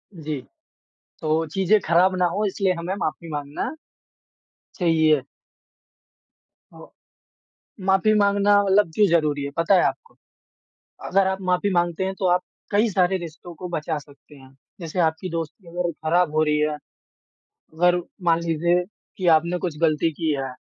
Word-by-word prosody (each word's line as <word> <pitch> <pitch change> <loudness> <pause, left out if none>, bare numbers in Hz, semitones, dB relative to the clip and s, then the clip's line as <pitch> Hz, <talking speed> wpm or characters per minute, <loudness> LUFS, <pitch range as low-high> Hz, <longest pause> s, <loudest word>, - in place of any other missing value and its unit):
जी। 155 -3 -4 0.8
तो 160 0 0
चीज़ें 195 +6 +2
ख़राब 180 +3 +4
ना 180 - +3
हो 205 +5 -2
इसलिए 195 -1 0
हमें 180 +3 -3
माफ़ी 165 +2 -3
माँगना 145 0 -4 1.0
चाहिए। 160 -5 +3 1.5
अ, - - -15 1.1
माफ़ी 195 +3 +4
माँगना 205 0 +4
मतलब 195 -3 +3
क्यों 210 - +5
ज़रूरी 150 -4 +1
है, 140 - -4
पता 165 +4 +3
है 180 - +5
आपको? 465 - -3 0.9
अगर 195 0 +3
आप 190 0 -2
माफ़ी 180 +3 +1
माँगते 175 +1 0
हैं 190 - -2
तो 190 - -1
आप 180 - +1 0.3
कई 215 +3 +3
सारे 185 -1 +2
रिश्तों 170 0 -9
को 180 - -7
बचा 160 -1 -2
सकते 145 +1 -18
हैं। 135 -1 -17 0.3
जैसे 170 +1 -5
आपकी 160 +2 0
दोस्ती 165 +2 -6
अगर 175 0 -2
ख़राब 170 0 +2
हो 155 - +4
रही 150 -1 +1
है, 150 0 0 1.0
अगर 175 +2 +3 0.3
मान 165 0 +3
लीजिए 170 +2 +1 0.3
कि 185 - -3
आपने 170 +3 -1
कुछ 170 -5 -4
गलती 160 0 +2
की 160 +1 -2
है 135 -1 -4
170 Hz, 150 wpm, -23 LUFS, 155-190 Hz, 1.5 s, क्यों